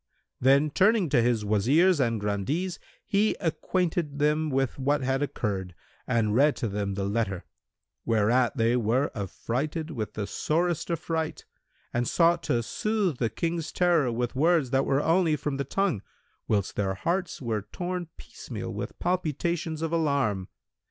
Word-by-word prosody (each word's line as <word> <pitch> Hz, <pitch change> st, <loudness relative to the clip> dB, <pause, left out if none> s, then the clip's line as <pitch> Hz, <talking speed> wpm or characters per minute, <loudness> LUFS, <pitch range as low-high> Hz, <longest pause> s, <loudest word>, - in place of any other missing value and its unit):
Then, 140 Hz, +4 st, +4 dB
turning 200 Hz, -1 st, +3 dB
to 130 Hz, -4 st, +4 dB
his 115 Hz, -3 st, +1 dB
Wazirs 140 Hz, -, +3 dB
and 115 Hz, -4 st, +1 dB
Grandees, 105 Hz, -, -2 dB, 0.3 s
he 205 Hz, +2 st, +2 dB
acquainted 165 Hz, -3 st, -1 dB
them 150 Hz, +1 st, +2 dB
with 135 Hz, -1 st, -1 dB
what 145 Hz, +2 st, +1 dB
had 135 Hz, +1 st, 0 dB
occurred 95 Hz, -10 st, -3 dB, 0.3 s
and 115 Hz, -4 st, +1 dB
read 140 Hz, +5 st, +4 dB
to 120 Hz, -, -2 dB
them 100 Hz, -1 st, -2 dB
the 100 Hz, -, -2 dB
letter, 100 Hz, -3 st, -1 dB, 0.6 s
whereat 115 Hz, +2 st, +2 dB
they 115 Hz, +1 st, +3 dB
were 125 Hz, +4 st, +1 dB
affrighted 135 Hz, -, -3 dB
with 110 Hz, -7 st, -4 dB
the 105 Hz, -, -2 dB
sorest 170 Hz, -, -1 dB
affright 160 Hz, -1 st, -2 dB, 0.5 s
and 120 Hz, 0 st, 0 dB
sought 170 Hz, 0 st, +3 dB
to 120 Hz, -6 st, 0 dB
soothe 205 Hz, -, -1 dB
the 115 Hz, -, +1 dB
King's 165 Hz, +7 st, -2 dB
terror 170 Hz, -8 st, +2 dB
with 120 Hz, +1 st, -2 dB
words 155 Hz, -2 st, +3 dB
that 135 Hz, 0 st, +2 dB
were 135 Hz, +2 st, +2 dB
only 165 Hz, -1 st, +3 dB
from 145 Hz, -1 st, -3 dB
the 140 Hz, -, -1 dB
tongue, 190 Hz, -, 0 dB, 0.5 s
whilst 100 Hz, -3 st, 0 dB
their 95 Hz, -2 st, 0 dB
hearts 175 Hz, -, -2 dB
were 115 Hz, -5 st, -2 dB
torn 180 Hz, -1 st, -3 dB
piecemeal -, -, -7 dB
with -, -, -5 dB
palpitations 170 Hz, -2 st, -1 dB
of 165 Hz, 0 st, -2 dB
alarm. 140 Hz, -, +1 dB
140 Hz, 150 wpm, -27 LUFS, 115-165 Hz, 0.6 s, Then